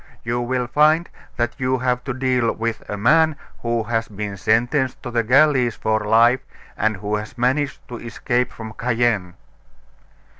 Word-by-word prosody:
You 120 +1 -1
will 125 +1 -1
find 155 +6 +3 0.3
that 120 -1 0
you 130 0 +1
have 125 0 -1
to 135 - -2
deal 130 -3 +1
with 115 0 -3
a 105 - -3
man 155 +8 +4 0.3
who 115 -1 0
has 115 0 -1
been 105 -1 -5
sentenced 120 +7 0
to 120 - -5
the 115 -1 +2
galleys 125 0 +3
for 110 0 0
life, 115 +4 +4 0.4
and 110 0 0
who 105 +2 -2
has 105 +4 -8
managed 135 +3 -1
to 120 - -7
escape 120 +1 -2
from 110 -1 -8
Cayenne." 115 -7 0
120 Hz, 160 wpm, -21 LUFS, 110-130 Hz, 0.4 s, man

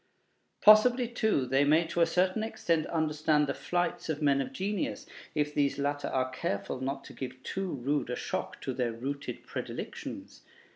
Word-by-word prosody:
Possibly, 240 +4 +7
too, 220 - +1
they 135 +2 +3
may 155 +4 +4
to 170 +1 -1
a 165 - +6
certain 185 +5 +1
extent 215 -8 0
understand 155 -2 +2
the 140 - -1
flights 175 +1 -2
of 155 -2 -1
men 140 -2 +3
of 135 - -4
genius, 200 0 -2 0.3
if 150 -1 0
these 140 -2 +1
latter 145 0 -1
are 130 0 0
careful 130 -1 -3
not 135 +1 -3
to - - -11
give 130 -1 -7
too 195 -1 -3
rude 140 +1 -1
a 125 - -1
shock - - -4
to 130 - -3
their 120 -2 -1
rooted 135 +5 -5
predilections. - - -6
150 Hz, 175 wpm, -30 LUFS, 135-180 Hz, 0.3 s, Possibly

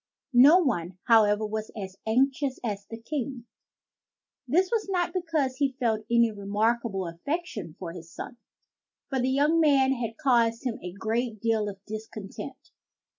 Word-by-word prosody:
" - - -49 0.2
No 340 - +8
one, 185 - 0
however, 215 -2 +5
was 215 0 -4
as 190 -1 -6
anxious 265 +3 +1
as 200 -3 -3
the 225 - -8
King. 255 -1 -4 1.0
This 360 +8 +2
was 445 -4 0
not 360 -2 0
because 320 -8 -1
he 275 -2 0
felt 220 -3 0
any 235 -1 +4
remarkable 210 0 0
affection 210 - -4
for 175 -3 -6
his 165 -1 -10
son, 240 - -8 0.7
for 265 - 0
the 255 +1 +1
young 295 +5 +3
man 275 -4 +4
had 230 -3 -4
caused 240 -4 +2
him 235 -3 -2
a 180 - -6
great 225 +3 -2
deal 220 -1 +1
of 195 -1 -9
discontent. 215 -2 -8
230 Hz, 155 wpm, -27 LUFS, 210-275 Hz, 1.0 s, No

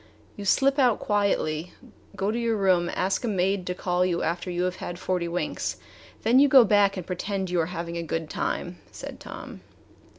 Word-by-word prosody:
"You 205 - -7
slip 275 +7 +3
out 250 -5 +4
quietly, 180 -5 0 0.4
go 195 +2 0
to 235 - -2
your 230 -2 0
room 185 -3 +2
ask 190 +5 0
a - - -1
maid 195 -2 0
to 180 - -2
call 180 0 0
you 175 -2 0
after 175 +2 -2
you 175 0 -1
have 185 0 -1
had 175 - -6
forty 180 -1 -1
winks, 175 +1 -2 0.5
then 235 +4 +5
you 285 - +7
go 260 -3 +8
back 200 -1 +3
and 180 - -5
pretend 190 +1 -3
you 175 -2 +2
are 160 - -1
having 170 -1 -5
a - - -2
good 165 -1 -3
time," - - -3
said - - -8
Tom. - - -9
185 Hz, 200 wpm, -26 LUFS, 175-205 Hz, 0.5 s, go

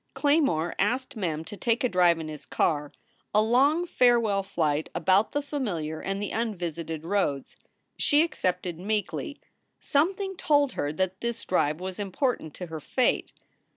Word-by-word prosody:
Claymore 280 - +2
asked 250 +7 0
Mem 165 -7 -2
to 205 - -8
take 230 +4 0
a - - +4
drive 180 -5 +4
in 160 -1 -5
his 155 -2 -8
car, 150 -2 0 0.4
a 210 - +6
long 280 +9 +3
farewell 235 - +3
flight 155 -5 -1
about 195 +3 +3
the 290 - -1
familiar 180 - -3
and 195 0 -2
the 205 - -4
un 225 -1 -1
visited 165 -2 -5
roads. 165 -7 -1 0.4
She 295 +1 +4
accepted 180 - -2
meekly. 210 +8 -2 0.4
Something 385 +6 0
told 290 -2 +3
her 145 -9 -2
that 190 +4 -2
this 235 -1 -3
drive 155 -3 +1
was 185 +2 -5
important 200 - -2
to 180 - -6
her 160 -2 -6
fate. 250 - 0
195 Hz, 155 wpm, -27 LUFS, 165-250 Hz, 0.4 s, a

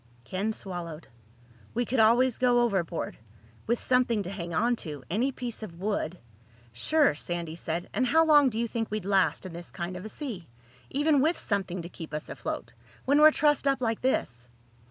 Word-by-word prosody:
Ken 190 - -2
swallowed. 175 -7 -6 0.7
"We 245 +1 +1
could 255 +1 -1
always 235 +3 +4
go 245 -1 +4
overboard—with 165 - -3
something 245 -4 +2
to 180 - -6
hang 175 -4 -5
on 235 +9 +2
to. 150 -8 -7
Any 240 +8 +1
piece 245 -3 -6
of 175 -6 -8
wood—" 185 -4 -2 0.6
"Sure," 310 - +3
Sandy 170 +1 -4
said. 170 +1 -3
"And 255 - +1
how 320 +5 +5
long 295 -3 +6
do 220 - -5
you 235 +1 0
think 225 0 -3
we'd 215 -3 -3
last 195 -1 +2
in 185 - -7
this 170 0 -8
kind 175 +1 -5
of 180 - -7
a 215 - -6
sea—even 205 - -2
with 320 +4 +2
something 190 -4 -2
to 170 - -7
keep 160 -4 -8
us 150 - -5
afloat—when 285 +3 -2
we're 310 - +10
trussed 295 -2 +2
up 275 -1 +2
like 225 -3 -1
this?" 120 - -1
210 Hz, 175 wpm, -28 LUFS, 170-250 Hz, 0.7 s, we're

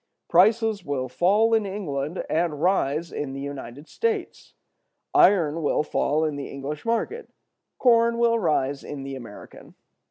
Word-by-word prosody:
Prices 215 +2 +3
will 140 -4 -2
fall 205 - +2
in 220 -1 +3
England 175 -6 -4
and 160 -2 -1
rise 170 -2 0
in 140 -2 -4
the 135 - -6
United 140 0 -7
States; 445 -5 -3 0.6
iron 175 - +4
will 150 0 +1
fall 155 +1 0
in 150 -2 -2
the 140 - -5
English 140 +4 -6
market; 235 - -2 0.5
corn 235 -1 +4
will 230 -1 +3
rise 145 -6 0
in 140 -2 -7
the 135 0 -6
American. 115 -6 -12
165 Hz, 145 wpm, -24 LUFS, 140-225 Hz, 0.6 s, iron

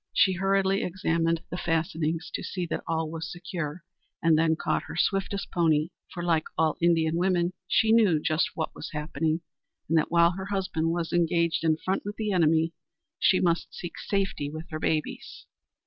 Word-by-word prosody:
She 190 - +4
hurriedly 195 +1 +2
examined 165 -2 0
the 180 - -3
fastenings 165 0 -1
to - - -2
see 180 -2 -3
that - - -1
all 160 -1 -1
was 165 0 -5
secure, 175 -2 -5 0.4
and 165 -2 +4
then 160 0 +3
caught - - 0
her - - -8
swiftest 195 +1 0
pony, 160 -3 +2 0.2
for, 175 - -5
like 165 -2 +2
all 160 -1 +2
Indian 165 -1 +3
women, 180 -1 +1
she 220 - +3
knew 210 -9 +5
just 155 +1 +1
what 160 - -3
was - - -7
happening, 155 +2 -1 0.5
and 165 - +1
that - - -1
while 170 0 +5
her 190 +1 -6
husband 185 -5 -1
was 170 0 -2
engaged 170 -1 +2
in 160 -1 +3
front 190 +4 -2
with 205 +1 -5
the 215 -2 -2
enemy, 165 -2 +3 0.5
she 185 - +4
must 170 -2 0
seek 175 - -7
safety 195 -8 -1
with 155 +3 -7
her 155 - -3
babies. 155 -1 -2
170 Hz, 180 wpm, -27 LUFS, 160-185 Hz, 0.5 s, knew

